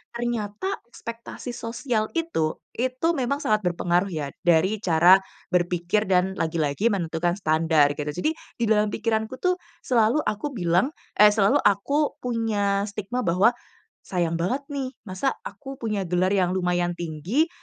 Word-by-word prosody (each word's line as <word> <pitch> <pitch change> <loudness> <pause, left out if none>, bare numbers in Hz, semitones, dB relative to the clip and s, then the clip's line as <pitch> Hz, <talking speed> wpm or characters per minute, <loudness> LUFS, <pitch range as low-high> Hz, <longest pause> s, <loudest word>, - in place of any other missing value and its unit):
ternyata 235 - -2 0.2
ekspektasi 235 +1 -8
sosial 230 -1 -2
itu, 325 - 0 0.2
itu 255 +5 0
memang 280 -1 -1
sangat 215 -1 +2
berpengaruh 175 0 +1
ya 150 -6 -4 0.2
dari 180 +5 +4
cara 175 0 +6 0.3
berpikir 175 +3 +1
dan 190 +1 +1
lagi-lagi 160 +4 0
menentukan 175 -3 0
standar 155 -4 +3
gitu. 150 +1 -5
Jadi 180 - -1 0.2
di 235 - -3
dalam 210 0 +4
pikiranku 220 +3 -1
tuh 365 0 +2 0.2
selalu 240 +4 +2
aku 215 +6 -2
bilang 180 - +1 0.2
eh 210 - +10
selalu 205 -1 +3
aku 280 +10 +1
punya 210 -4 0
stigma 210 +4 -4
bahwa, 195 +1 +3 0.5
"Sayang 170 -3 -1
banget 185 +12 0
nih, 270 -2 -3 0.2
masa 190 +9 0 0.2
aku 270 -1 -10
punya 210 -4 -1
gelar 180 +1 +1
yang 185 -2 +2
lumayan 175 -1 0
tinggi 175 - -1
200 Hz, 140 wpm, -25 LUFS, 175-235 Hz, 0.5 s, eh